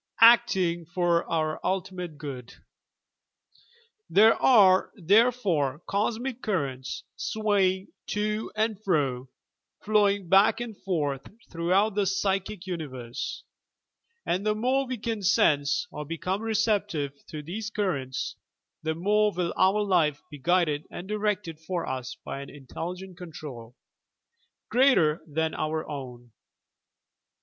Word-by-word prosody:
ACTING 190 -8 +5
FOB 175 -1 +1
OUR 155 -2 0
ta/TIMATE 180 -3 -3
GOOD 130 -5 -7 1.5
There 220 +3 +6
are, 195 -7 +5
therefore, 185 - +2
Cosmic 230 +5 -2
Currents 135 - -3
swaying 200 -3 0 0.2
to 210 +1 -2
and 215 -1 -1
fro, 135 -9 0 0.5
flowing 205 -3 +2
back 195 +6 +5
and 240 -3 -5
forth 145 -9 -2 0.2
throughout 185 +5 +2
the 200 -1 +1
Psychic 195 0 -1
Uni 175 -4 -3
verse, 125 -1 -6 0.8
and 185 +3 0
the 215 0 +1
more 260 +5 +1
we 255 0 -3
can 225 -1 -3
"sense" 145 - +3
or 150 - -5
become 165 +6 -3
receptive 205 -11 -1
to 150 -1 -7
these 205 +7 -5
currents, 140 - -2 0.4
the 160 0 -2
more 210 +5 +2
will 175 -2 -2
our 195 +3 +3
life 165 -7 +2
be 145 - -9
guided 155 -1 +1
and 175 - -8
directed 210 -6 -2
for 175 +2 -3
us 130 -1 -4
by 135 - -5
an 140 - -9
Intelligent 180 +6 -7
Control, 140 -9 -9 0.9
greater 195 - +4
than 160 +1 -1
our 155 +1 -2
own. 125 -4 -8
180 Hz, 120 wpm, -27 LUFS, 150-210 Hz, 1.5 s, There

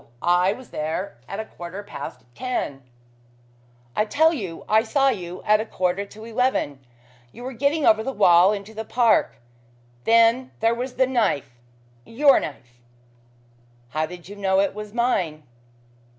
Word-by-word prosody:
I 180 +2 +3
was 250 +4 -9
there 160 +1 -4
at 195 - -5
a 220 - -3
quarter 180 +1 -8
past 200 - -8
ten." 145 - -3 1.1
"I - - +3
tell 315 +8 +3
you 190 - -6
I 220 +1 +4
saw 270 +4 +2
you 180 -7 -5
at 210 0 +4
a - - 0
quarter 185 +2 -1
to 215 +2 -12
eleven. 230 - -1 0.5
You 245 - -11
were 260 +1 -5
getting 285 +5 +1
over 220 0 +5
the 270 - -3
wall 185 -4 +5
into 205 +1 -5
the 220 +1 -5
park. 230 0 +2 0.7
Then 230 +3 +4
there 225 +1 +3
was 250 +2 -4
the 260 - +3
knife 235 - 0 0.5
your 275 - +4
knife." 125 -4 -9 1.1
"How 155 +4 -1
did 175 0 -11
you 205 - -9
know 190 -1 +1
it 195 0 +1
was 210 0 -7
mine?" 185 -10 0
210 Hz, 155 wpm, -23 LUFS, 180-245 Hz, 1.1 s, over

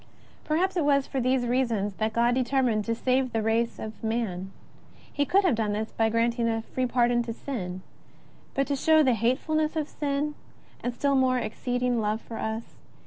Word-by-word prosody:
Perhaps 360 +5 +1
it 335 - +2
was 280 -2 +3
for 270 - -2
these 255 0 +2
reasons 235 -5 0
that 220 0 0
God 235 +2 +2
determined 250 -4 +1
to 230 - 0
save 255 +1 +1
the 225 -1 0
race 230 +1 +1
of 220 0 -8
man. 210 -5 -2 0.5
He 285 - -3
could 395 +2 +4
have 365 - +3
done 215 -2 0
this 220 +1 -3
by 225 -1 +1
granting 230 +1 +1
a 225 0 -1
free 255 +2 -2
pardon 240 0 +2
to 235 -1 -4
us. 190 -7 -5 0.7
But 275 - +2
to 280 - -1
show 315 +3 +4
the 260 -3 +4
hate 235 +3 +2
fulness 310 +1 -1
of 310 -2 -1
sin, 290 0 -2 0.5
and 245 - -1
still 280 +4 0
more 260 -1 +3
His 245 - -1
exceeding 245 0 -1
love 215 +1 0
for 230 0 -8
us. 220 +1 -4
240 Hz, 195 wpm, -27 LUFS, 225-275 Hz, 0.7 s, could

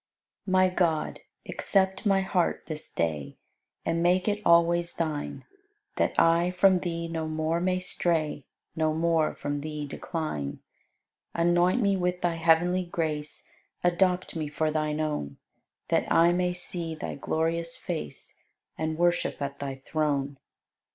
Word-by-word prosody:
My 185 0 +4
God, 170 -4 0 0.3
accept 190 +1 +1
my 195 -1 +4
heart 190 -2 0
this 155 -1 -5
day 75 -4 -2 0.5
And 165 0 0
make 180 +3 +3
it 210 0 0
always 170 0 +4
Thine, 155 -3 -3 0.5
That - - +1
I 170 +1 +4
from 185 +1 +4
Thee 170 -1 -3
no 165 -1 -3
more 155 +1 0
may 185 0 +1
stray, 165 -5 -1 0.3
No 155 -1 +1
more 165 -1 +2
from 145 0 -3
Thee 150 0 -4
decline. 140 - -4 0.8
Anoint 175 +6 +3
me 200 -1 +3
with 180 0 -1
Thy 170 -1 0
heavenly 170 +3 +3
grace, 155 -3 -3 0.4
Adopt 180 +1 +2
me 155 -2 -2
for 155 +1 -1
Thine 155 0 -1
own, 150 - -2 0.5
That - - +1
I 170 +1 +6
may 180 0 +1
see 175 -2 -2
Thy 155 - -5
glorious 165 +3 -1
face 170 -3 -5 0.4
And 160 0 -1
worship 175 +1 +1
at 140 0 -4
Thy 135 -1 -5
throne. 140 -3 -1
165 Hz, 135 wpm, -27 LUFS, 155-180 Hz, 0.8 s, I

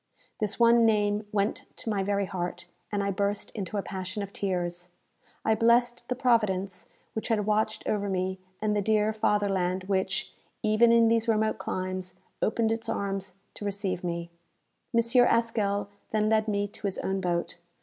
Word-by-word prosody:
This 215 +1 -2
one 235 0 +6
name 210 -1 +2
went 205 0 -1
to - - -9
my 200 -2 0
very 200 0 0
heart, 175 -2 -4 0.3
and 205 -1 0
I 200 - 0
burst 200 +1 -1
into 205 -1 -4
a 200 - -1
passion 190 +2 -4
of 200 0 -8
tears. 175 -2 -2 0.6
I 220 - +4
blessed 240 +2 +3
the 250 - 0
Providence 200 -7 +1 0.2
which 220 - -3
had 215 -3 +1
watched 215 +1 0
over 205 -1 0
me, 190 0 -1 0.2
and 210 -1 +2
the 205 - +2
dear 215 +1 +2
fatherland 195 -4 +1
which, 190 0 -1 0.3
even 215 +2 +5
in 230 -1 +6
these 230 0 +2
remote 220 -1 +2
climes, 185 -1 -4 0.3
opened 225 +1 +2
its 225 0 -2
arms 195 -2 -3 0.2
to - - -9
receive 200 -3 -2
me! 170 -1 -3 0.6
M. 235 -1 +4
Haskell 230 -4 +2 0.2
then 215 0 +1
led 220 0 +3
me 205 -1 0
to 205 - -5
his 195 - -2
own 190 0 -1
boat. 175 -1 -1
205 Hz, 170 wpm, -28 LUFS, 190-220 Hz, 0.6 s, one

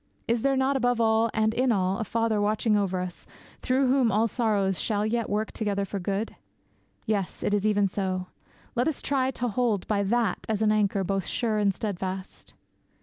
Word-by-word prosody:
Is 235 0 +1
there 275 +1 +2
not 265 +1 +2
above 245 -2 +1
all, 225 0 +3
and 220 0 +1
in 250 +2 +2
all, 190 -1 +1
a - - 0
Father 225 -1 0
watching 215 +1 +2
over 190 -3 0
us, 180 -1 -7 0.3
through 260 +1 +2
whom 255 -3 +3
all 220 +2 +3
sorrows 205 -5 0
shall 210 -2 0
yet 230 +1 -1
work 215 +1 -1
together 200 -2 -1
for 195 +1 -4
good? 200 +4 -2 0.7
Yes, 205 -4 -2
it 205 - 0
is 205 0 +2
even 205 -1 +3
so. 185 -1 -2 0.5
Let 245 +5 +1
us 315 - -1
try 265 -2 +1
to 245 -2 -2
hold 230 -4 0
by 205 -2 +1
that 220 -1 +1
as 220 -1 0
an 215 - +4
anchor 200 -2 +1
both 195 0 -1
sure 220 -3 0
and 205 -1 +3
steadfast.' 190 -2 -5
215 Hz, 195 wpm, -27 LUFS, 200-235 Hz, 0.7 s, an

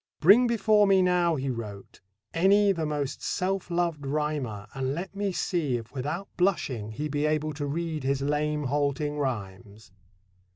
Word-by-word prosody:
"Bring 210 +10 +7
before 215 -2 +3
me 190 -1 +5
now," 175 -2 +2
he 135 -1 -2
wrote, 105 -5 -8 0.3
"any 200 +4 +4
the 165 -5 -1
most 145 -2 -3
self 190 0 -2
loved 170 -4 -1
rhymer, 140 -8 -2
and 135 +1 -2
let 185 +4 -6
me 200 -1 -1
see 160 -8 -1
if 115 -1 -10
without 150 +8 -3
blushing 140 - 0
he 145 +8 -4
be 145 +1 0
able 155 0 0
to 145 -1 -4
read 160 0 -3
his 135 +1 0
lame, 150 +1 0
halting 145 +2 -1
rhymes." 105 -5 -5
150 Hz, 160 wpm, -27 LUFS, 135-175 Hz, 0.3 s, Bring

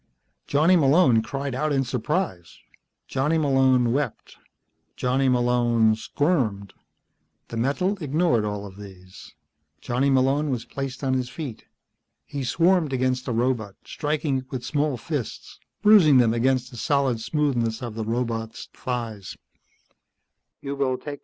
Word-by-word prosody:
Johnny 155 +6 +4
Malone 140 -6 +4
cried 135 +4 -4
out 150 +4 -1
in 135 -2 +2
surprise. 125 - -3 0.5
Johnny 150 +5 0
Malone 130 -5 +3
wept. 145 +2 -3 0.6
Johnny 130 +1 +1
Malone 120 -3 +3
squirmed. 110 - -1 0.8
The 115 - -5
metal 180 - 0
ignored 150 -5 +1
all 105 -1 -3
of 95 -1 -11
these. 95 -2 -13 0.4
Johnny 130 +3 0
Malone 135 +3 +2
was 125 -4 -2
placed 135 -1 -6
on 130 -1 +1
his 130 -1 -1
feet. 135 -6 -7 0.6
He 140 -1 -5
swarmed 165 +3 +2
against 130 0 0
the - - -1
robot, 115 -4 -1
striking 150 -2 -1
it 130 0 -12
with 125 -2 -5
small 145 -2 0
fists, 140 -2 -5 0.2
bruising 195 -10 +7
them 115 -3 +4
against 125 +1 +1
the 120 - -10
solid 135 -3 0
smoothness 120 -5 -1
of 120 -3 -5
the 110 0 -4
robot's 115 0 -3
thighs. 115 -6 -5
130 Hz, 125 wpm, -24 LUFS, 115-145 Hz, 0.8 s, bruising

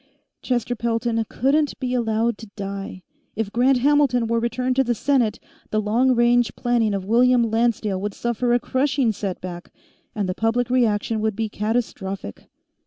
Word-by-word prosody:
Chester 245 -1 -1
Pelton 230 0 -1
couldn't 285 +4 +1
be 255 -2 -2
allowed 230 -2 0
to 225 - -10
die. 195 -2 -6 0.3
If 220 -2 -2
Grant 255 +3 +3
Hamilton 270 -2 +3
were 230 +1 0
returned 250 +2 -1
to 270 - +5
the 240 -1 0
Senate, 245 -3 +1 0.3
the 215 - 0
long 240 +5 +2
range 240 -1 +3
planning 235 -4 +1
of 190 -1 -4
William 245 +3 +4
Lancedale 225 -4 0
would 205 0 -4
suffer 240 +1 -1
a 240 - +4
crushing 260 -1 +1
setback, 185 -3 -6 0.4
and 205 -3 -1
the 185 - -1
public 230 +4 0
reaction 225 -3 +1
would 220 -1 0
be 220 0 -2
catastrophic. 205 - -3
230 Hz, 160 wpm, -22 LUFS, 210-245 Hz, 0.4 s, to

